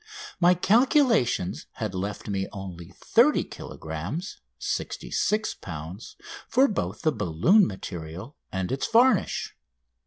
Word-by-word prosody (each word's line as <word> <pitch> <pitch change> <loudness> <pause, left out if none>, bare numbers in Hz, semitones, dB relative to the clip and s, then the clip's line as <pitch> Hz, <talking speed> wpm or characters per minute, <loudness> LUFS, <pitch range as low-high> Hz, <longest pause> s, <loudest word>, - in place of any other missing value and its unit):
My 180 +1 +5
calculations 230 - +2
had 105 -3 -4
left 100 +3 -4
me 95 -1 -1
only 90 -4 -8
30 - - +4
kilogrammes 85 - -6 0.2
(66 215 +1 -1
lbs.) 85 +5 -8 0.3
for 265 +2 +5
both 210 - -3
the 155 - +3
balloon 115 - +3
material 90 - -7 0.2
and 95 -1 -2
its 135 - -1
varnish. 230 -2 +3
105 Hz, 105 wpm, -26 LUFS, -, 0.3 s, My